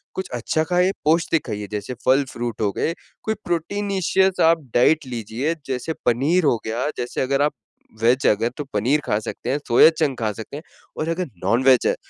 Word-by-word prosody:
कुछ 190 - -4
अच्छा 125 +6 0
खाइए, 180 +2 +2
पौष्टिक 165 +1 +2
खाइए, 105 0 -4
जैसे 105 +4 -4
फल 135 +2 +4
फ्रूट 120 -2 -4
हो 105 - +1
गए, 165 - -1 0.3
कोई 220 - 0
प्रोटीनिशियस 190 +2 0
आप 165 0 +4 0.2
डाइट 150 +5 +4
लीजिए, 125 +6 -3
जैसे 130 +4 -3
पनीर 140 +10 +2
हो 125 - +3
गया। 120 +6 -1
जैसे 120 0 -3
अगर 135 +1 +1
आप 150 - +1 0.5
वेज 125 +3 +3
हैं - - +6
अगर, 115 +3 -1
तो 150 - -3
पनीर 125 +9 +2
खा 105 - +1
सकते 110 - -6
हैं, 140 - +1
सोया 120 +6 +7
चंक 155 -5 -1
खा 110 -2 0
सकते 110 +6 -8
हैं 155 - -9 0.3
और 155 - -2
अगर 175 +2 -1 0.2
नॉन 115 +7 +2
वेज 130 -2 +5
है, - - +2
135 Hz, 200 wpm, -22 LUFS, 120-165 Hz, 0.5 s, सोया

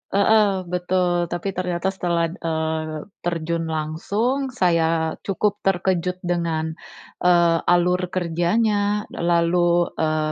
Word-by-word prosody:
Heeh, 200 -2 +3
betul, 180 -1 0
tapi 175 +3 -3
ternyata 180 +1 -1
setelah, 170 -3 -1
eee, 160 -2 -3 0.2
terjun 170 -1 -2
langsung 200 - -1
saya 165 -8 +1
cukup 205 +1 0
terkejut 180 -1 0
dengan, 165 -2 -1 0.5
eee, 170 -2 +4
alur 180 +1 +3
kerjanya. 205 +4 0
Lalu, 175 0 +2
eee, 155 -1 0
175 Hz, 100 wpm, -22 LUFS, 165-185 Hz, 0.5 s, eee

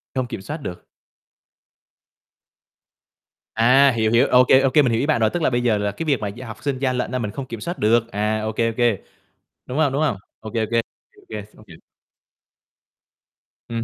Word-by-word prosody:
Không 130 -1 -1
kiểm 120 -6 -6
soát 145 +11 -5
được. 90 -8 -7 2.7
À, 130 +5 +5
hiểu, 110 -2 0
hiểu, 115 +1 +4
OK, 125 0 +5 0.2
OK 135 -2 +1
mình 150 -2 +6
hiểu 115 - +1
ý 135 - 0
bạn 145 -6 +1
rồi, 110 - +4
tức 175 - -3
là - - +3
bây 120 -1 0
giờ 115 -3 +2
là 105 0 -1
cái 135 +11 -6
việc 140 -6 +1
mà 105 - -3
gia 120 +5 -8
học 110 - -10
sinh 140 -3 -2
gian 130 -2 0
lận 125 - -2
á 130 - -1
mình 105 -4 -3
không 135 - -6
kiểm 115 -3 -7
soát 175 - -5
được, 115 +2 +2
à, 105 +1 -1
OK, 110 0 -4
OK. 115 +1 +2 0.8
Đúng 130 - -5
không, 150 -4 +2
đúng 140 - 0
không? 145 -10 +1 0.2
OK, 110 +1 -9
OK, 110 -1 -1
OK, 115 0 +3 0.5
OK. 105 -2 -6
Không - - -17
hiểu. 85 - -13 1.9
Ừm 115 -1 -3
115 Hz, 205 wpm, -22 LUFS, 110-130 Hz, 2.7 s, mình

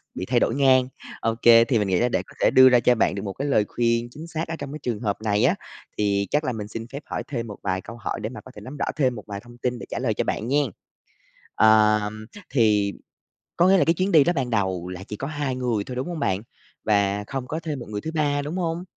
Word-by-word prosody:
bị 95 - -4
thay 120 +3 +2
đổi 115 - +1
ngang. 130 -2 +4 0.3
OK, 115 +1 -1 0.3
thì 120 -5 +2
mình 105 - 0
nghĩ 95 -2 +2
là 125 - +2
để - - 0
có - - -15
thể - - +4
đưa 130 0 +8
ra 125 -1 +5
cho 125 +1 +3
bạn 110 - +1
được 100 - -4
một 100 -2 -4
cái 140 - -4
lời 110 -7 +3
khuyên 115 0 0
chính 160 +6 -9
xác 160 0 -4
ở 165 - -4
trong 140 -1 -6
cái 155 - -6
trường 115 -4 -2
hợp 105 -4 -1
này 105 +1 +1
á, 170 +9 +3 0.4
thì 100 -1 +1
chắc 150 +1 +2
là 130 - -1
mình 105 -2 -5
xin 115 +2 -7
phép 140 +4 -8
hỏi - - -4
thêm 120 -5 -4
một 105 - -8
vài 95 -1 -1
câu 115 +5 -10
hỏi 110 - -4
để 110 - -3
mà 130 - -9
có 130 - -13
thể 105 - -10
nắm 130 +7 -9
rõ - - -1
thêm 130 -5 +1
một 105 - -8
vài 100 -1 -5
thông 120 0 -15
tin 125 -1 -2
để - - -7
trả - - -3
lời 120 -4 0
cho - - -1
bạn 110 - -2
nghen. 145 +2 +2 0.9
Ờ, 110 -1 +5 0.5
thì 105 -6 +3 0.7
có 175 +2 +5
nghĩa 195 0 +6
là - - +3
cái 165 - +4
chuyến 185 +3 -1
đi 155 -5 +7
đó 175 - +1
ban 130 -3 -1
đầu 95 -5 -1
là 90 +1 -7
chỉ 105 - -7
có 135 - -5
2 145 -4 -2
người 120 -5 -1
thôi, 125 - -7
đúng 130 +6 -3
hông 170 -3 -4
bạn? 95 -6 0 0.4
Và 100 -1 +2
không 135 -2 -4
có 160 +4 -3
thêm 155 -5 -4
một 120 - -7
người 105 -1 -4
thứ 160 - -4
ba, 145 -2 +1
đúng 150 +5 -5
hông? 170 0 -2
120 Hz, 280 wpm, -24 LUFS, 105-145 Hz, 0.9 s, đưa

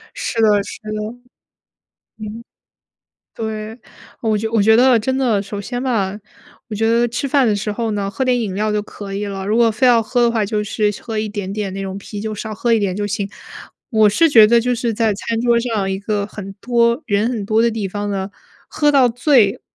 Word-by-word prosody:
是 230 - -2
的， 220 - +5
是 200 +1 -9
的。 215 - -8 1.3
嗯， 215 +2 -7 0.9
对， 220 +1 -5 0.4
我 220 -2 +1
就 220 +1 -3
我 220 -3 +3
觉 220 +2 +5
得 250 -1 +5
真 260 +4 -1
的 230 -7 +1
首 205 0 -6
先 245 +5 -4
吧， 205 -6 -1 0.5
我 215 - -5
觉 225 +2 0
得 235 +1 +3
吃 250 +4 -3
饭 270 -2 +3
的 210 - +2
时 210 +1 -3
候 230 +1 -2
呢， 200 -1 -2
喝 265 - -2
点 250 -1 +2
饮 200 -5 -3
料 210 +1 0
就 210 - +1
可 200 -1 -8
以 205 +1 -2
了， 195 -1 -5
如 215 +2 +1
果 235 -1 +4
非 220 +4 +1
要 235 -2 +5
喝 240 +2 0
的 235 - +4
话， 225 -3 0
就 210 0 -1
是 210 0 0
喝 225 -2 -4
一 215 0 -2
点 200 -2 -5
点 200 -2 -3
那 195 0 -5
种 190 0 -5
啤 205 +1 -8
酒， 215 0 -4
少 215 +1 -6
喝 235 +2 0
一 225 - +4
点 195 -3 -1
就 205 0 -2
行。 200 0 -3 0.6
我 220 -3 +5
是 325 +11 +4
觉 225 -7 +7
得， 235 +1 +4
就 250 +1 0
是 235 -2 -2
在 220 -1 +1
餐 225 +3 -3
桌 235 0 +3
上 220 -5 -1
一 190 - -2
个 205 0 -2
很 200 -2 -8
多 235 +2 +2
人 210 +1 +1
很 225 -5 -3
多 215 +2 +2
的 235 0 +3
地 215 -3 -3
方 205 +2 -4
呢， 195 0 -3 0.4
喝 295 -1 +2
到 260 -3 +5
醉， 240 -4 +3
220 Hz, 245 characters per minute, -19 LUFS, 205-235 Hz, 1.3 s, 觉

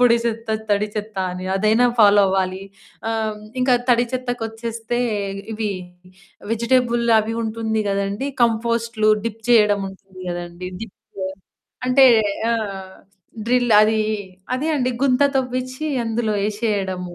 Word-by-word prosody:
పొడి 240 -1 +6
చెత్త, 225 -1 -2 0.2
తడి 205 +1 +2
చెత్త 210 -1 -5
అని 180 +1 -6
అదైనా 215 +5 +3
ఫాలో 205 -1 +7
అవ్వాలి. 190 0 0 0.5
ఆహ్, 220 -1 -1 0.2
ఇంకా 250 0 +4
తడి 240 0 +4
చెత్తకొచ్చేస్తే 230 -2 -3 0.5
ఇవి 215 0 -2 0.8
వెజిటబుల్ 235 +1 +1
అవి 220 +1 -1
ఉంటుంది 220 0 -1
కదండీ, 200 +6 -1
కంపోస్టులు, 230 -1 +1 0.2
డిప్ 225 0 -6
చేయడం 210 -3 +5
ఉంటుంది 190 -1 -15
కదండీ! 175 +1 -6
డిప్ 225 -4 -9 0.9
అంటే 265 +1 +7 0.5
ఆ! - - +2 0.9
డ్రిల్ 245 -2 +3
అది, 220 0 +2 0.6
అదే 300 +5 -2
అండి 255 -2 0
గుంత 265 0 +3 0.2
తవ్విచ్చి 255 +3 -3 0.2
అందులో 225 -1 -1
యేసేయడము. 200 -4 -2
225 Hz, 115 wpm, -21 LUFS, 205-240 Hz, 0.9 s, ఫాలో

